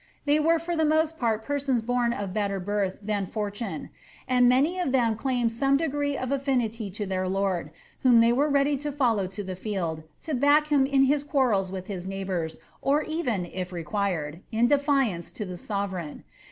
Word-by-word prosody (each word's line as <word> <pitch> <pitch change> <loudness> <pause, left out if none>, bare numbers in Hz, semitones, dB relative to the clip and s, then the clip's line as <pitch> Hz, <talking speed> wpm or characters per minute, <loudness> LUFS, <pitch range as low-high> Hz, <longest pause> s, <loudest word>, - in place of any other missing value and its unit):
They 295 +1 +3
were 330 +2 +4
for 335 +1 -3
the 320 - +2
most 315 +1 +2
part 225 -2 0
persons 275 -5 0
of 235 -6 0
better 200 -2 -1
birth 195 0 -1
than 205 -2 -1
fortune, 210 +2 -4 0.4
and 250 -1 +4
many 290 +9 +3
of 350 -7 0
them 235 -4 +2
claimed 245 -1 0
some 275 +4 +2
degree 285 -2 -1
of 255 0 -3
affinity 245 -6 -1
to 205 +2 -4
their 185 -1 -1
lord, 190 -2 -1 0.3
whom 245 -3 +6
they 230 +1 +5
were 285 +4 +2
ready 280 0 +2
to 295 +2 -4
follow 235 -9 +1
to 195 +2 -6
the 185 -1 -5
field, 180 -5 -3 0.2
to 315 - -3
back 290 +3 +4
hun 280 -3 +4
in 270 -1 +4
his 280 +1 +2
quarrels 245 -10 +1
with 190 -1 -5
his 185 -2 -6
neighbours, 190 -4 -3 0.2
or 290 +3 +2
even, 250 - -1
if 180 +1 -5
required, 175 -3 -2
in 225 +1 +3
defiance 275 - +1
to 210 - -4
the 180 -1 -6
sovereign. 190 -5 -4
235 Hz, 185 wpm, -26 LUFS, 195-280 Hz, 0.4 s, whom